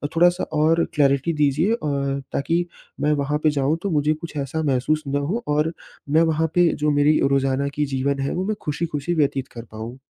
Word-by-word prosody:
थोड़ा-सा 175 +2 +4 0.2
और 165 +2 +3
क्लैरिटी 140 +2 +2
दीजिए 150 +7 +2
अ, - - 0 0.6
ताकि 165 +5 0 0.4
मैं 150 +1 +2
वहाँ 145 0 0
पे 155 - +5
जाऊँ, 145 +2 0
तो 200 - -1
मुझे 150 0 +2
कुछ 160 +1 -9
ऐसा 145 +3 -2
महसूस 145 +2 0
ना 140 +1 0
हो 185 +12 -2
और 150 +2 +1 0.4
मैं 155 +3 +4
वहाँ 160 -1 +2
पे 175 -1 +5 0.2
जो 150 - +3
मेरी 145 +1 +3
रोज़ाना 135 0 +1
की 150 - +1
जीवन 140 +1 0
है, 135 0 -1
वो 185 - -2
मैं 215 +1 -1
खुशी-खुशी 150 +1 -2
व्यतीत 140 -3 0
कर 115 - -7
पाऊँ? 110 +3 -7
150 Hz, 195 wpm, -22 LUFS, 140-165 Hz, 0.6 s, पे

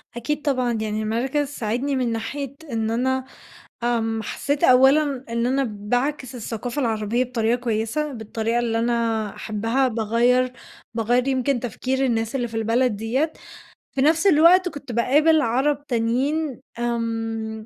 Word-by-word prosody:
أكيد 295 +5 -2
طبعًا، 255 -5 0
يعني 215 0 -2
المركز 260 +7 0
ساعدني 265 +1 -2
من 250 -2 0
ناحية 265 +5 -4 0.2
إن 225 -1 -1
أنا 260 +2 0 0.6
آمم، 225 -2 0
حسيت 285 +6 -2
أولًا 265 +1 +4
إن 235 +1 0
أنا 270 +2 +1
باعكس 245 +5 -2
الثقافة 240 +3 -4
العربية 225 0 0
بطريقة 235 -1 0
كويسة 240 +6 -1
بالطريقة 225 0 -2
اللي 230 -1 0
أنا 230 -2 0
أحبها، 225 +5 0
باغيَّر 240 +3 +2 0.4
باغيَّر 240 +3 +1
يمكن 260 -1 +1
تفكير 260 +3 -2
الناس 225 -1 0
اللي 245 -2 -1
في 225 - -7
البلد 225 +1 +1
ديّة، 255 +9 -1 0.6
في 270 - -1
نَفس 320 +6 +3
الوقت 360 +3 +6
كنت 280 -4 -9
باقابل 295 +7 +4
عرب 280 +4 0
تانيين 260 +5 0 0.2
آمم، 225 -2 -3
240 Hz, 135 wpm, -23 LUFS, 225-270 Hz, 0.6 s, الوقت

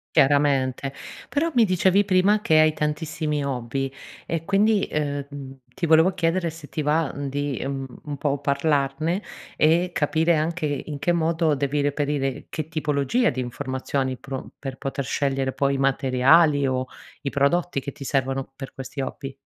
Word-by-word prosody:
Chiaramente. 135 -1 +3 0.4
Però 330 +3 0
mi 240 -3 +5
dicevi 190 0 +3
prima, 200 +2 +3
che 160 -6 +4
hai 155 0 +5
tantissimi 150 -1 -2
hobby 135 0 -2 0.3
e 165 -1 -3
quindi, 200 +2 +3
ehm, 145 -2 -2
mhmm, 135 -2 -9 0.2
ti 180 - 0
volevo 160 +4 +5
chiedere 170 0 +1
se 160 -2 -11
ti 155 - -3
va, 150 0 +1
uhm, 140 0 -4
di, 145 -1 -2
uhm, 135 0 -3 0.2
un 145 -1 -4
po' 140 0 -1
parlarne 145 +4 0 0.3
e 170 +3 +3
capire 160 +3 +2
anche 160 +2 -1
in 145 0 -3
che 145 +5 +1
modo 165 -1 +2
devi 145 +1 0
reperire 145 -1 -1
che 155 -2 -4
tipologia 155 - +1
di 130 - -3
informazioni 130 +1 -3
pro 135 0 -7
per 135 -2 -6
poter 135 +1 -3
scegliere 135 -1 0
poi 140 0 +1
i - - -1
materiali, 135 +3 +4
o 130 -1 0 0.4
i 140 - -2
prodotti 140 +3 +1
che 140 - -6
ti 140 - -10
servono 135 0 -1
per 135 -1 -8
questi 135 +1 -6
hobby. 135 +1 -5
145 Hz, 165 wpm, -24 LUFS, 135-160 Hz, 0.4 s, mi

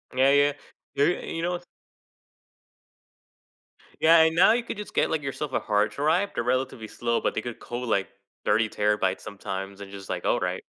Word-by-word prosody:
Yeah, 135 +2 +5
yeah. 145 0 +4 0.4
Y 140 - +4 0.2
and - - -6
you - - -2
know 175 0 -1 2.4
Yeah, 165 +1 +7
and 160 0 +3
now 185 +5 +6
you 240 +1 0
could 230 - -6
just 210 - -7
get, - - +2
like, 160 -2 0
yourself 135 +1 -4
a - - +1
hard 105 -1 +1
drive, 160 +8 +1
they're 120 - -1
relatively 130 -2 -1
slow, 115 +1 -1
but - - -1
they - - -1
could 120 -2 -6
hold, 120 0 -5
like, 100 -2 +1 0.4
30 110 +1 +2
terabytes 105 -2 +1
sometimes 100 0 -6
and 100 - -9
just, 100 -1 -10
like, - - -3
alright. - - 0
125 Hz, 185 wpm, -26 LUFS, 105-155 Hz, 2.4 s, Yeah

